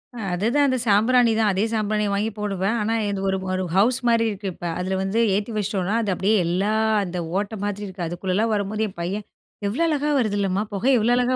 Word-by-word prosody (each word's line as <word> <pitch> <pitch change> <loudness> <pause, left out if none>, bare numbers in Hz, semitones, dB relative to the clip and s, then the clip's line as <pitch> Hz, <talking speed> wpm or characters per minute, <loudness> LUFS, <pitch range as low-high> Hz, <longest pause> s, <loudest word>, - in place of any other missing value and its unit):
அ - - -8 0.2
அதுதான் 235 +10 +2
அந்த 260 -1 +1
சாம்பிராணி 230 +3 +4
தான். 215 -2 +3
அதே 190 +2 +1
சாம்பிராணிய 210 -1 0
வாங்கி 205 +2 0
போடுவேன். 200 +1 -1
ஆனா, 220 +2 0 0.2
இது 200 -1 -2
ஒரு 190 - 0 0.2
ஒரு 185 0 -1
ஹவுஸ்மாரி 235 +1 +3
இருக்கு 200 -1 -5
இப்ப. 175 - -9
அதில 190 +1 -1
வந்து 195 +4 0 0.2
ஏத்தி 205 +3 -2
வச்சுட்டோன்னா, 200 0 -1
அது 205 -4 -1
அப்டியே 195 +4 +1
எல்லா 185 +5 0 0.3
அந்த 180 -1 -5 0.2
ஓட்ட 205 +2 -4
மாதிரி 205 0 -3
இருக்கு, 185 -2 -5
அதுக்குள்ளலாம் 185 +6 -1
வரும்போது 210 +1 -1
என் 185 - -17
பையன் 195 +4 -3 0.4
எவ்ள 225 +11 -2
அழகா 295 -1 0
வருதுல்லம்மா! 205 -3 0
புகை 235 +7 +1
எவ்ள 220 +3 +1
அழகா 250 +1 +2
205 Hz, 195 wpm, -23 LUFS, 190-225 Hz, 0.4 s, சாம்பிராணி